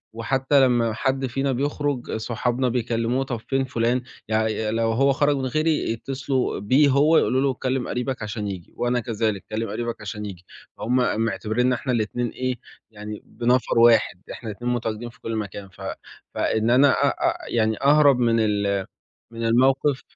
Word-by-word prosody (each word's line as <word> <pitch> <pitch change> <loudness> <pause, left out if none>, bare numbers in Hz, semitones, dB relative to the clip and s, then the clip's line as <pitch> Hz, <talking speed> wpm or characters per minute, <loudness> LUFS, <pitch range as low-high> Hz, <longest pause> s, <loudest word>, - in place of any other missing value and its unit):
وحتى 135 +4 +2
لمّا 120 -3 +2
حد 135 +4 -1
فينا 135 +2 -1
بيخرُج 145 0 -2
صحابنا 120 +3 -1
بيكّلموه، 120 +1 0
طب 125 -3 -4
فين 135 0 +1
فُلان، 125 -1 0 0.3
يعني 110 0 0
لو 115 0 +1
هو 135 +5 +3
خرج 145 +1 +2
من 130 - -2
غيري 155 +4 0
يتّصلوا 130 +2 -2
بيه 130 +9 +4
هو 145 +4 +4
يقولوا 130 - +2
له 135 -1 +2
كلِّم 130 0 -2
قريبك 125 -1 -3
عشان 105 -1 -4
ييجي، 95 -4 -7
وأنا 120 0 +1
كذلك 110 -3 -2
كلِّم 110 0 -2
قريبك 115 +1 -4
عشان 105 0 -5
ييجي، 90 -3 -9 0.3
هُم 120 +3 0 0.3
معتبريننا 120 +3 0
إحنا 130 +2 -3
الاتنين 120 +2 -1
إيه 130 0 -2 0.4
يعني 105 0 -8
بنفر 120 0 +1
واحد، 115 -5 +4
إحنا 115 - -7
الاتنين 120 +4 -3
متواجدين 115 0 -3
في 115 - -20
كُلّ 115 - -4
مكان، 100 -2 -5
ف 95 +1 -17 0.5
فإن 110 +1 0
أنا 135 +3 +6
أ - - +2
أ - - 0
يعني 110 -2 +1
أهرب 145 -2 +5
من 115 -2 +3
ال 100 -3 0 0.5
من 115 0 -4
الموقف 130 +3 +3
120 Hz, 165 wpm, -23 LUFS, 110-130 Hz, 0.5 s, أنا